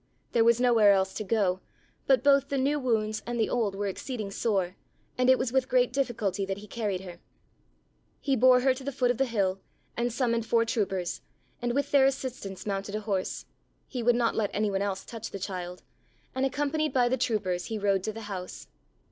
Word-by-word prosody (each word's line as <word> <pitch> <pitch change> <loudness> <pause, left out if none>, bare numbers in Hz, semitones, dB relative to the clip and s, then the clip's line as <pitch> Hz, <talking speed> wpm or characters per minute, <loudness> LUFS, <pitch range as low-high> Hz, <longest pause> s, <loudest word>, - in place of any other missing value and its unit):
There 230 - +4
was 235 +1 +4
nowhere 230 -5 +5
else 190 -1 +1
to 215 - -4
go, 195 -3 +1 0.5
but 265 -2 +4
both 280 -1 +4
the 280 - -1
new 285 +3 +1
wounds 220 -4 0
and 240 0 -2
the 220 - +1
old 220 -5 0
were 205 +1 -2
exceeding 210 +1 -4
sore 195 -4 0 0.4
and 250 0 +2
it 260 - +7
was 250 -2 -1
with 265 0 +1
great 250 -1 +3
difficulty 225 -8 -1
that 195 0 -3
he 205 - -10
carried 205 -3 -3
her. 175 -2 -10 1.0
He 275 -1 +1
bore 250 +1 +6
her 260 0 +4
to 260 +1 -9
the 280 - -3
foot 250 -2 +1
of 245 - -4
the 270 - +2
hill 195 -5 0 0.4
and 240 +1 0
summoned 235 -2 0
four 230 -1 +3
troopers, 190 -6 -2 0.4
and 240 0 -1
with 280 - 0
their 275 -2 +6
assistance 255 -8 -4
mounted 200 0 -3
a 215 - -2
horse. 200 -3 -2 0.4
He 250 - -4
would 240 +1 +3
not 235 -1 +2
let 210 -3 0
any 210 0 +1
one 195 0 -1
else 195 -1 -2
touch 230 -2 -7
the - - -6
child 180 -2 -6 0.5
and, 260 +1 +1
accompanied 290 +2 -1
by 245 -2 +3
the 250 - +2
troopers, 205 -8 -1
he 220 - -3
rode 200 -2 +1
to 215 - -1
the 225 +1 -8
house. 195 -4 -7
225 Hz, 210 wpm, -28 LUFS, 195-255 Hz, 1.0 s, it